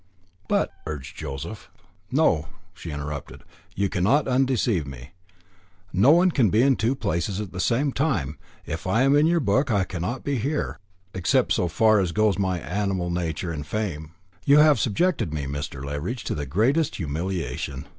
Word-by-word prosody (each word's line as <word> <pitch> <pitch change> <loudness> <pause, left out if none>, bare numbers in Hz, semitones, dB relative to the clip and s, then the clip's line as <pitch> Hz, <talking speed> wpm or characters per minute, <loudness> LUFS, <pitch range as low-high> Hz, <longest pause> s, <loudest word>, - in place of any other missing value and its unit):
"But - - +1
" - - -14
urged 70 -3 -6
Joseph. 70 +10 -7 0.4
"No," 125 - +2 0.3
she 85 - -9
interrupted, 75 -1 -6 0.3
"you 100 +1 +1
cannot 105 +11 +2
undeceive 125 - +1
me. 65 +1 -10 0.8
No 100 +9 +5
one 175 +4 +6
can 125 -9 +3
be 110 +6 +3
in 135 -1 +4
two 120 +4 0
places 90 -2 -2
at 105 -3 -5
the 95 - -7
same 130 +8 +1
time. 80 - -1 0.3
If 85 +3 -5
I 115 +7 +3
am 135 +1 +4
in 150 +2 +5
your 170 0 +3
book, 135 +2 +1
I 100 -4 +2
cannot 95 +7 -4
be 140 -3 -1
here 85 - -2 0.3
except 95 -3 +2
so 90 - +1
far 110 +5 +4
as 90 -3 0
goes 105 -3 +2
my 95 -2 0
animal 90 +1 -2
nature 85 0 -2
and 75 -3 -4
frame. 80 -3 -4 0.3
You 140 +1 +5
have 150 -4 +6
subjected 125 - 0
me, 70 -2 -3
Mr. 70 -1 -5
Leveridge, 75 - -4
to - - -2
the 75 -2 -4
greatest 130 - +1
humiliation. 80 -5 -4
95 Hz, 175 wpm, -24 LUFS, 80-125 Hz, 0.8 s, one